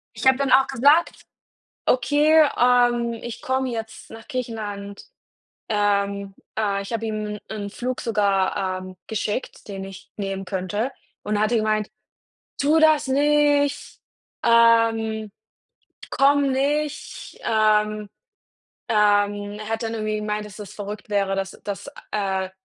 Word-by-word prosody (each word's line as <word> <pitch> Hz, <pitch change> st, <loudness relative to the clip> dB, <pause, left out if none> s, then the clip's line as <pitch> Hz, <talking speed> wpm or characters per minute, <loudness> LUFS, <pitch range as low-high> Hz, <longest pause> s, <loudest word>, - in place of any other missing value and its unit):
Ich -, -, -1 dB
habe 265 Hz, 0 st, +6 dB
dann 275 Hz, -1 st, 0 dB
auch 270 Hz, 0 st, +6 dB
gesagt: 290 Hz, +8 st, +3 dB, 0.6 s
„Okay, 300 Hz, +5 st, +4 dB
ähm, 240 Hz, -1 st, +3 dB
ich 240 Hz, -1 st, -7 dB
komme 260 Hz, 0 st, -1 dB
jetzt 225 Hz, -2 st, -6 dB
nach 225 Hz, 0 st, -12 dB
Griechenland.“ 210 Hz, -5 st, -5 dB, 0.7 s
Ähm, 200 Hz, -2 st, 0 dB, 0.2 s
äh, 200 Hz, -2 st, 0 dB
ich 200 Hz, -, -8 dB
habe 225 Hz, 0 st, -2 dB
ihm 215 Hz, -1 st, -3 dB
'n 205 Hz, -2 st, -5 dB
Flug 250 Hz, +4 st, -4 dB
sogar, 195 Hz, -3 st, 0 dB
ähm, 185 Hz, 0 st, -10 dB
geschickt, 215 Hz, +2 st, -4 dB
den 195 Hz, -1 st, -5 dB
ich 195 Hz, 0 st, -12 dB
nehmen 195 Hz, -1 st, -3 dB
könnte 205 Hz, +6 st, -2 dB, 0.3 s
und 210 Hz, 0 st, -1 dB
hat 215 Hz, +2 st, +1 dB
er 240 Hz, -, +3 dB
gemeint: 215 Hz, -1 st, 0 dB, 0.7 s
„Tu 300 Hz, +3 st, +4 dB
das 310 Hz, -3 st, +4 dB
nicht, 285 Hz, +1 st, +2 dB, 0.4 s
ähm, 225 Hz, -2 st, +3 dB, 0.8 s
komm 280 Hz, 0 st, +3 dB
nicht.“ 290 Hz, +2 st, -2 dB
Ähm, 215 Hz, -1 st, +2 dB, 0.8 s
ähm, 205 Hz, -1 st, +2 dB
er 215 Hz, 0 st, -7 dB
hat 225 Hz, +1 st, -2 dB
dann 225 Hz, 0 st, -3 dB
irgendwie 215 Hz, -1 st, -2 dB
gemeint, 210 Hz, 0 st, -3 dB
dass 205 Hz, -, -12 dB
das 205 Hz, -3 st, -9 dB
verrückt 205 Hz, +1 st, -7 dB
wäre, 195 Hz, -1 st, +1 dB
dass 195 Hz, 0 st, -3 dB
dass 200 Hz, -1 st, -5 dB, 0.2 s
äh, 190 Hz, -2 st, -1 dB
215 Hz, 130 wpm, -23 LUFS, 205-250 Hz, 0.8 s, habe